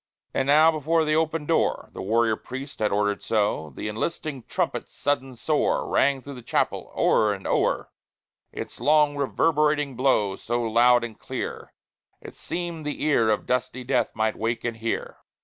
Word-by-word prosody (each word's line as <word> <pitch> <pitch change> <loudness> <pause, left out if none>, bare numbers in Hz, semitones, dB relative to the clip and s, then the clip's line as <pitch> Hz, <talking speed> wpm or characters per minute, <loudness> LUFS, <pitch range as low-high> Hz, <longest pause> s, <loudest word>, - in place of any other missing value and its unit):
And 135 - 0
now 155 +3 +6
before 160 +1 +1
the 155 0 +2
open 160 -1 0
door 165 +1 0
The - - -6
warrior 110 +3 +2
priest 130 +5 -8
had 105 - +1
order'd 105 0 0
so 105 -8 0
The - - -4
enlisting 135 +5 -3
trumpet's - - -2
sudden 135 -2 -1
soar 150 +5 0
Rang 135 -1 +2
through 140 - -8
the 125 - -9
chapel, 115 - -1
o'er 105 -1 +3
and 95 - -12
o'er, - - 0 0.6
Its - - -7
long 150 -1 +4
reverberating 150 0 +1
blow, 115 -7 +2
So 120 +1 -2
loud 120 +2 +4
and 115 -3 -7
clear, - - -5 0.5
it - - -11
seem'd 170 -2 -5
the 150 0 -4
ear 130 -7 +3
Of 105 -2 0
dusty 125 0 -1
death 125 -3 +1
must 110 0 0
wake 115 +1 -2
and 115 -1 -3
hear. 115 0 -3
130 Hz, 165 wpm, -25 LUFS, 115-150 Hz, 0.6 s, now